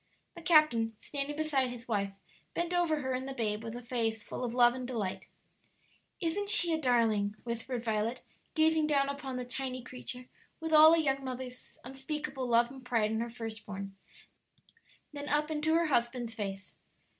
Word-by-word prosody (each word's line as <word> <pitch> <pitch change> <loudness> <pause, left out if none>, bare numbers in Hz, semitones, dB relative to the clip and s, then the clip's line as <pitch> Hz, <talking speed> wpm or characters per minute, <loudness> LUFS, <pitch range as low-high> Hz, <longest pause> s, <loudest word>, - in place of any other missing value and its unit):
The 340 - -10
captain, 245 -10 +4
standing 285 0 -4
beside 290 -4 +1
his 245 0 -9
wife, 200 -3 0 0.4
bent 345 +1 -1
over 335 -4 +2
her 260 -1 -2
and 260 +1 -3
the 270 - -5
babe 215 -3 -1
with 225 0 -6
a 245 - -7
face 225 -2 -1
full - - -6
of 240 -1 -3
love 240 -1 +6
and 255 -1 -5
delight. 215 -7 -3 0.9
"Isn't 400 +4 -1
she 350 -5 +7
a 315 - 0
darling?" 225 -6 +2
whispered 235 +1 -4
Violet, 225 +2 -1 0.3
gazing 315 -1 +3
down 280 -2 +2
upon 280 -2 -5
the 250 0 -3
tiny 255 0 -4
creature 250 0 -7 0.3
with 320 -1 -3
all 310 +1 +9
a - - +2
young 275 -3 +1
mother's 255 -1 -7
unspeakable 270 0 -4
love 235 +1 +3
and 265 -1 -11
pride 230 -4 +1
in 220 - 0
her 235 +1 -2
first 225 -2 -6
born, 195 -1 -6 1.2
then 290 0 -5
up 300 +1 +1
into 310 +1 +1
her 335 0 +3
husband's 240 -4 +1
face. 200 -3 -5
255 Hz, 180 wpm, -31 LUFS, 230-300 Hz, 1.2 s, all